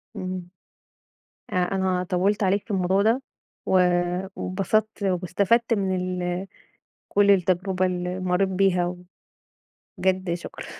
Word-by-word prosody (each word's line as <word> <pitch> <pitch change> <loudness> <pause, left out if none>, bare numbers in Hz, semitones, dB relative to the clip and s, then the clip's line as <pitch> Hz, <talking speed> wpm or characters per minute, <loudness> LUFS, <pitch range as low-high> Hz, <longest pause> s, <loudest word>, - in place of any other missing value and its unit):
اهم. 185 -1 -5 1.0
أ - - -2
أنا 185 0 +1
طوّلت 195 +3 +1
عليك 195 +1 +2
في - - -8
الموضوع 190 0 +2
ده، 225 +5 +2 0.4
و - - -3 0.6
واتبسطت 205 +3 -1
واستفدت 195 +5 +1
من 195 -3 0
ال 180 0 -2 0.6
كل 200 0 +4
التجربة 185 0 +2
اللي 180 0 -2
مريت 185 +1 +1
بيها، 185 -2 +2 1.1
وبجد 185 -2 +1
شكرًا. 175 - -8
185 Hz, 110 wpm, -24 LUFS, 180-195 Hz, 1.1 s, كل